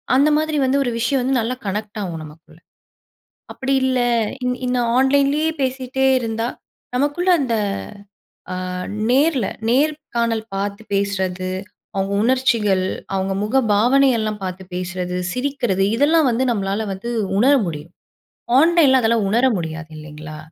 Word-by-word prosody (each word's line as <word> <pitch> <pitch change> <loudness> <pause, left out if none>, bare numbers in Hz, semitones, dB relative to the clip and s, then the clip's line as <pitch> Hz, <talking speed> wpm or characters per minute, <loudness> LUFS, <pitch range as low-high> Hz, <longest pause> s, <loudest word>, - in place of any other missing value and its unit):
அந்த 285 +3 +5
மாதிரி 310 -1 -1
வந்து 265 +2 +2
ஒரு 245 - -1
விஷயம் 255 +3 +1
வந்து 260 -1 +1
நல்லா 235 +3 -2
கனெக்ட் 210 +2 -4
ஆகும் 170 -4 -4
நமக்குள்ள. 155 +2 -15 0.9
அப்படி 270 0 -1
இல்ல 260 -1 +1 0.4
இந் 250 0 -1
இந்த 250 0 0 0.2
ஆன்லைன்லேயே 280 +3 +3
பேசிட்டே 260 0 -1
இருந்தா 225 0 -2 0.5
நமக்குள்ள 290 +7 +1
அந்த 235 -3 -1 1.0
அ - - -3 0.6
நேர்ல 270 -4 +3 0.2
நேர்காணல் 240 -5 0
பார்த்து 200 +2 -3
பேசறது, 190 -2 -1 0.5
அவங்க 195 0 -1
உணர்ச்சிகள், 230 -7 +2 0.3
அவங்க 190 0 -1
முக 235 +6 +1 0.2
பாவனையெல்லாம் 230 -2 +3
பார்த்து 185 0 -5
பேசறது, 180 0 -3 0.2
சிரிக்கிறது 250 -7 -1
இதெல்லாம் 305 +3 +3
வந்து 245 +3 0
நம்மளால 200 0 -1
வந்து 235 +5 -6 0.3
உணர 265 +6 +5
முடியும். 155 0 -6 0.7
ஆன்லைன்ல 315 -5 +5
அதெல்லாம் 225 -2 +2
உணர 240 +4 +3
முடியாது 160 -1 -5
இல்லிங்களா? 155 0 -9
235 Hz, 125 wpm, -20 LUFS, 195-265 Hz, 1.0 s, அந்த